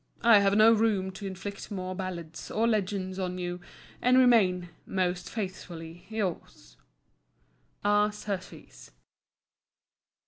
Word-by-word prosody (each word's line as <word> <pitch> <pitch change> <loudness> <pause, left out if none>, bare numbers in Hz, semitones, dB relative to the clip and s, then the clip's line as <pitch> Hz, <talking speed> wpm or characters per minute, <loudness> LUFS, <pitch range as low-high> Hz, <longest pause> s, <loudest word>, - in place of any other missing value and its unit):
I 230 -3 +8
have 200 0 +3
no 220 +1 +7
room 210 -4 +1
to 195 +1 -7
inflict 195 +1 -7
more 185 -3 -4
ballads 175 -4 -6
or 225 +2 +1
legends 195 -3 -1
on 180 -1 -2
you; 175 0 -4 0.4
and 250 +1 +4
remain, 195 -9 +4 0.2
most 180 -2 -1
faithfully 175 -4 -7
yours, 180 - -4 1.1
R. 205 +1 +4
SURTEES. 200 - -7
190 Hz, 110 wpm, -28 LUFS, 180-210 Hz, 1.1 s, I